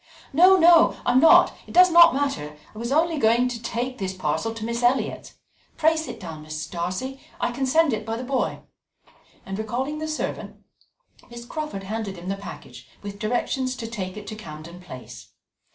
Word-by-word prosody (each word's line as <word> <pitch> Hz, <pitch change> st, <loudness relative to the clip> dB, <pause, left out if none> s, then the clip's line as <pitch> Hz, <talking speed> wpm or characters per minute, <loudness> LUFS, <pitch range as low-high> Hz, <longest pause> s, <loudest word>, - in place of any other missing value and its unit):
"No, 365 Hz, +6 st, +7 dB
no, 340 Hz, -1 st, +5 dB
I -, -, +3 dB
am 250 Hz, -, +5 dB
not 325 Hz, -, +6 dB
it -, -, -11 dB
does 365 Hz, 0 st, +7 dB
not 340 Hz, -2 st, +7 dB
matter 150 Hz, -, -2 dB, 0.2 s
I 215 Hz, -, -10 dB
was 235 Hz, +2 st, -4 dB
only 320 Hz, +1 st, +2 dB
going 235 Hz, +1 st, +3 dB
to 235 Hz, -2 st, -6 dB
take 245 Hz, +2 st, -4 dB
this 190 Hz, -1 st, -3 dB
parcel 160 Hz, +4 st, -2 dB
to 225 Hz, -1 st, -5 dB
Miss 235 Hz, +1 st, -3 dB
Elliot's 245 Hz, +2 st, 0 dB, 0.4 s
pray 320 Hz, 0 st, +3 dB
sit 260 Hz, -8 st, -5 dB
down, 160 Hz, -5 st, -8 dB
Mrs. 155 Hz, 0 st, -6 dB
Darcy 185 Hz, +11 st, -4 dB, 0.2 s
I -, -, 0 dB
can 265 Hz, +2 st, -2 dB
send 315 Hz, 0 st, +3 dB
it 215 Hz, 0 st, -3 dB
by 225 Hz, +1 st, -4 dB
the 245 Hz, -, -5 dB
boy"; 260 Hz, 0 st, -2 dB, 0.8 s
and 195 Hz, +1 st, -5 dB
recalling 260 Hz, +7 st, -3 dB
the 315 Hz, -, -4 dB
servant, 310 Hz, -, -4 dB, 0.7 s
Miss 235 Hz, 0 st, -10 dB
Crawford 300 Hz, -8 st, -5 dB
handed 205 Hz, -1 st, -5 dB
him 175 Hz, +2 st, -7 dB
the 195 Hz, -, -1 dB
package 200 Hz, 0 st, -11 dB, 0.2 s
with 200 Hz, 0 st, -7 dB
directions 255 Hz, +3 st, -1 dB
to 240 Hz, -, -6 dB
take 200 Hz, -4 st, -6 dB
it 210 Hz, -, -8 dB
to 215 Hz, -, -7 dB
Camden 170 Hz, -2 st, -10 dB
Place. 130 Hz, -8 st, -11 dB
235 Hz, 190 wpm, -24 LUFS, 195-275 Hz, 0.8 s, No